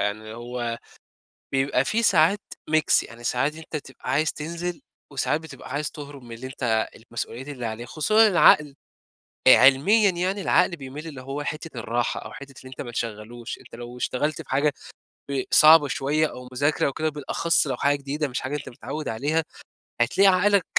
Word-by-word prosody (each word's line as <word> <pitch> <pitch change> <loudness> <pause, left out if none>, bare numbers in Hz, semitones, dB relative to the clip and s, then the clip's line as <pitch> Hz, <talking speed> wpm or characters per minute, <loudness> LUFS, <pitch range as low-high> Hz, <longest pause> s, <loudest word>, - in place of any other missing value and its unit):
يعني 110 +2 -3
هو 120 0 -4 0.7
بيبقى 135 -1 +1
في 230 +10 0
ساعات 190 0 +4 0.3
ميكس، 155 0 +3
يعني 120 0 -13
ساعات 135 +5 0
أنت 160 0 -9
تبقى 135 -2 -7
عايز 155 +4 +1
تنزل 170 +2 -5 0.3
وساعات 140 +2 0
بتبقى 160 -5 -11
عايز 145 +1 -2
تهرب 145 -3 -10
من 120 -1 -9
اللي 125 +3 -7
أنت 115 -4 -1
المسؤوليّات 115 +3 -6
اللي 130 -5 -6
عليك، 115 +2 -5
خصوصًا 215 +10 +4
العقل 150 -7 +5 0.7
آآ، - - +10
علميًا 195 +11 +5
يعني 185 +3 -1
العقل 180 - +3
بيميل 145 +2 -8
اللي 140 -5 -8
هو 135 +3 -5
حِتّة 155 -3 -5
الراحة 120 +1 -1
أو - - -9
حِتّة 140 0 -10
اللي 130 - -12
أنت 130 - -8
ما 120 - -6
تشغلوش، 115 0 -5
أنت - - -14
لو 120 +1 -9
اشتغلت 145 +4 -1
بحاجة 145 +2 0 0.6
ب 135 -2 0
صعبة 155 -1 +7
شويَّة 145 +5 +1
أو 125 -4 -9
مُذاكرة 145 +4 +1
أو 140 - -1
كده 155 +3 -1
بالأخص 155 +3 +1
لو 130 -3 -2
حاجة 140 +3 +2
جديدة 140 +2 -3
مش 125 - -3
حاجة 130 +3 -4
أنت 145 - -7
متعود 140 +6 -6
عليها، 145 +8 0 0.6
هتلاقي 195 +12 +4
عقلك 195 0 +4
140 Hz, 175 wpm, -24 LUFS, 125-155 Hz, 0.7 s, آآ